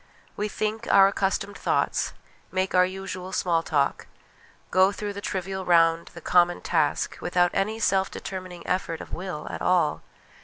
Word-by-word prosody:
We 210 Hz, -, -1 dB
think 215 Hz, +2 st, -2 dB
our 195 Hz, 0 st, +8 dB
accustomed 200 Hz, 0 st, -1 dB
thoughts, -, -, 0 dB, 0.4 s
make 185 Hz, 0 st, -1 dB
our 180 Hz, 0 st, +5 dB
usual 185 Hz, -1 st, -6 dB
small 170 Hz, -3 st, +1 dB
talk, 145 Hz, -4 st, 0 dB, 0.6 s
go 190 Hz, +1 st, +5 dB
through 205 Hz, 0 st, -5 dB
the 200 Hz, -, -7 dB
trivial 190 Hz, 0 st, -3 dB
round, 165 Hz, -1 st, +3 dB
the 170 Hz, -, -9 dB
common 175 Hz, +1 st, +3 dB
task, 155 Hz, -4 st, 0 dB
without 175 Hz, 0 st, +2 dB
any 215 Hz, +3 st, 0 dB
self 195 Hz, -3 st, +2 dB
determining 185 Hz, -2 st, -7 dB
effort 180 Hz, -3 st, -1 dB
of -, -, -10 dB
will 180 Hz, -4 st, -5 dB
at -, -, -6 dB
all. 180 Hz, -4 st, +2 dB
185 Hz, 155 wpm, -26 LUFS, 175-195 Hz, 0.6 s, our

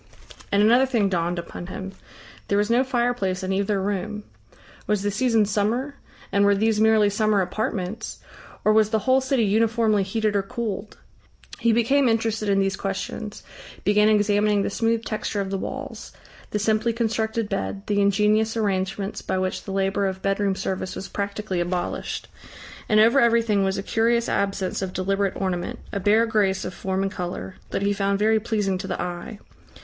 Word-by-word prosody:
And 200 Hz, +1 st, +4 dB
another 245 Hz, +5 st, +5 dB
thing 225 Hz, -6 st, +1 dB
dawned 175 Hz, -1 st, -1 dB
upon 170 Hz, +1 st, -7 dB
him. 190 Hz, +1 st, -6 dB, 0.6 s
There 200 Hz, -, +1 dB
was 210 Hz, +2 st, +1 dB
no 245 Hz, +2 st, +4 dB
fireplace 240 Hz, -8 st, -1 dB
in 190 Hz, +1 st, -1 dB
either 200 Hz, +1 st, 0 dB
room. 205 Hz, +2 st, -3 dB, 0.6 s
Was 210 Hz, -2 st, +1 dB
the 205 Hz, -, 0 dB
season 225 Hz, 0 st, +2 dB
summer, 220 Hz, +7 st, 0 dB, 0.4 s
and 200 Hz, 0 st, +3 dB
were 200 Hz, 0 st, +5 dB
these 215 Hz, +1 st, +1 dB
merely 220 Hz, -1 st, +5 dB
summer 215 Hz, 0 st, +2 dB
apartments, 205 Hz, +2 st, -3 dB, 0.5 s
or 215 Hz, -, +5 dB
was 215 Hz, -1 st, +4 dB
the 220 Hz, -, +2 dB
whole 260 Hz, +1 st, +4 dB
city 265 Hz, -2 st, +1 dB
uniformly 220 Hz, 0 st, +2 dB
heated 210 Hz, +2 st, -1 dB
or 200 Hz, -, +3 dB
cooled? 210 Hz, 0 st, -5 dB, 0.6 s
He 235 Hz, -1 st, +3 dB
became 240 Hz, +4 st, +3 dB
interested 225 Hz, -2 st, 0 dB
in 195 Hz, 0 st, +3 dB
these 195 Hz, -1 st, +1 dB
questions, 195 Hz, +2 st, -5 dB, 0.4 s
began 210 Hz, +1 st, +4 dB
examining 210 Hz, -1 st, +3 dB
the -, -, -2 dB
smooth 230 Hz, +1 st, 0 dB
texture 215 Hz, -1 st, -3 dB
of 195 Hz, -1 st, -2 dB
the 195 Hz, -, -1 dB
walls, -, -, -6 dB, 0.4 s
the -, -, -1 dB
simply 215 Hz, +2 st, +1 dB
constructed 225 Hz, -1 st, -1 dB
bed, 195 Hz, 0 st, -3 dB
the 205 Hz, -1 st, +1 dB
ingenious 210 Hz, +3 st, +2 dB
arrangements 195 Hz, -1 st, -1 dB
by -, -, -2 dB
which 185 Hz, 0 st, -2 dB
the 195 Hz, -, -5 dB
labour 195 Hz, +1 st, 0 dB
of 190 Hz, 0 st, -5 dB
bedroom 195 Hz, 0 st, +1 dB
service 185 Hz, -1 st, -3 dB
was 190 Hz, -, -6 dB
practically 200 Hz, -2 st, -3 dB
abolished. 175 Hz, +1 st, -3 dB, 0.6 s
And 215 Hz, -, +5 dB
over 230 Hz, +5 st, +6 dB
everything 230 Hz, -4 st, +3 dB
was 190 Hz, 0 st, 0 dB
a 195 Hz, -, -3 dB
curious 235 Hz, +2 st, +1 dB
absence 195 Hz, -1 st, -1 dB
of 190 Hz, -1 st, -3 dB
deliberate 195 Hz, +1 st, -1 dB
ornament, 180 Hz, -2 st, -2 dB
a 200 Hz, -, -2 dB
bare 210 Hz, +4 st, +4 dB
grace 200 Hz, -4 st, +1 dB
of 180 Hz, -, -5 dB
form 190 Hz, +1 st, -2 dB
and 195 Hz, -, -1 dB
colour, 180 Hz, 0 st, -5 dB
that -, -, -2 dB
he 200 Hz, 0 st, +2 dB
found 200 Hz, 0 st, 0 dB
very 220 Hz, +2 st, +3 dB
pleasing 210 Hz, -4 st, -1 dB
to -, -, -5 dB
the -, -, -3 dB
eye. 180 Hz, +5 st, -5 dB
205 Hz, 175 wpm, -24 LUFS, 195-220 Hz, 0.6 s, over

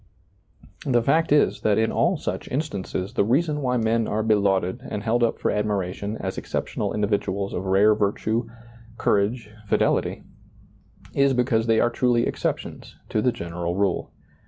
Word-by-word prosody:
The 120 Hz, -3 st, +2 dB
fact 160 Hz, +6 st, +2 dB
is, 145 Hz, 0 st, +3 dB
that 105 Hz, -2 st, +2 dB
in 110 Hz, 0 st, +2 dB
all -, -, +2 dB
such -, -, -4 dB
instances 105 Hz, -, -3 dB
the 125 Hz, -, +2 dB
reason 150 Hz, +7 st, +1 dB
why 125 Hz, -2 st, +1 dB
men 115 Hz, 0 st, +1 dB
are 110 Hz, +1 st, -1 dB
belauded 100 Hz, -4 st, +1 dB
and 105 Hz, -, -4 dB
held 115 Hz, +1 st, +1 dB
up 115 Hz, -, +2 dB
for -, -, 0 dB
admiration 105 Hz, 0 st, -2 dB
as 95 Hz, -, -4 dB
exceptional -, -, -3 dB
individuals 100 Hz, -1 st, -1 dB
of 95 Hz, -, -3 dB
rare 100 Hz, +3 st, +5 dB
virtue, 110 Hz, +3 st, -1 dB, 0.5 s
courage, 105 Hz, +2 st, 0 dB, 0.2 s
fidelity, -, -, +1 dB, 0.9 s
is 140 Hz, -1 st, +3 dB
because 120 Hz, -2 st, +1 dB
they 115 Hz, -1 st, +4 dB
are 120 Hz, -, +2 dB
truly 120 Hz, -1 st, +2 dB
exceptions -, -, -4 dB
to 110 Hz, -, 0 dB
the 125 Hz, -, +2 dB
general 85 Hz, -2 st, -4 dB
rule. 100 Hz, -2 st, 0 dB
110 Hz, 155 wpm, -24 LUFS, 100-120 Hz, 0.9 s, rare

